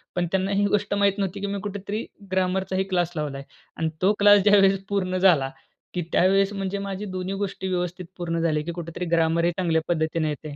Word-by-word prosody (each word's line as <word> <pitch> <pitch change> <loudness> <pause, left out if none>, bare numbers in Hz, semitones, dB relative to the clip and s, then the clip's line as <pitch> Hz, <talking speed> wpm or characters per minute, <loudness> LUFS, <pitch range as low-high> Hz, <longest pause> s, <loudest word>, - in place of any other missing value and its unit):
पण 175 -1 0
त्यांना 190 +1 0
ही 200 +1 +2
गोष्ट 205 0 0
माहीत 200 0 +2
नव्हती, 195 0 -2
की 200 - -2
मी 200 0 -3
कुठेतरी 205 +2 -4 0.3
ग्रामरचाही 190 0 0
क्लास 175 -1 +1
लावलाय. 140 -3 -4 0.3
आणि 160 -1 0
तो 205 +3 +5
क्लास 205 0 +7
ज्यावेळेस 195 -2 +5
पूर्ण 185 -2 0
झाला, 165 -8 +4 0.4
की 180 - -1
त्यावेळेस 195 +2 +3
म्हणजे 195 0 -3
माझी 200 +1 -4
दोन्ही 185 0 -4
गोष्टी 195 -1 -3
व्यवस्थित 180 0 -2
पूर्ण 170 -1 -2
झाले, 155 -2 +1
की 170 - -4
कुठेतरी 170 +1 -5
ग्रामर 165 +1 +2
हे 175 - +3
चांगल्या 165 -3 +1
पद्धतीने 160 -1 0
येते. 150 0 -6
185 Hz, 195 wpm, -24 LUFS, 170-195 Hz, 0.4 s, क्लास